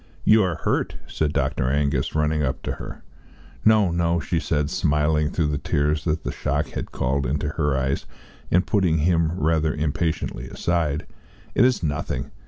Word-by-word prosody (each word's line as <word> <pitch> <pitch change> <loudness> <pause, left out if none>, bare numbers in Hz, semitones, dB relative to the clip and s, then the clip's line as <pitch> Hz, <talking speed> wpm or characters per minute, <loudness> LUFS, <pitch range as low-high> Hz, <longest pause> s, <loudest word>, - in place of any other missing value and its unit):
"You 110 0 +6
are 90 -4 0
hurt," - - -1
said 75 -2 -1
Dr. 65 - 0
Angus, 70 -1 0
running 75 0 +1
up 65 -3 -2
to - - -2
her. - - -8 0.6
"No, 110 -4 +5
no," 85 0 +1
she 80 +1 -1
said, 75 -3 -1
smiling 75 0 +2
through 80 -3 0
the 70 -1 -1
tears 75 +1 0
that 80 -1 0
the - - -2
shock 75 +2 -1
had - - -5
called 65 +1 0
into 75 +3 -1
her 75 -3 0
eyes, 65 +1 -1 0.4
and 90 +2 +3
putting 90 -6 +2
him 80 0 +2
rather 80 -2 +1
impatiently 75 -4 -2
aside; 80 -4 -1 0.5
"it - - +4
is 125 -7 +2
nothing. 75 -4 -2
75 Hz, 170 wpm, -23 LUFS, 75-85 Hz, 0.6 s, You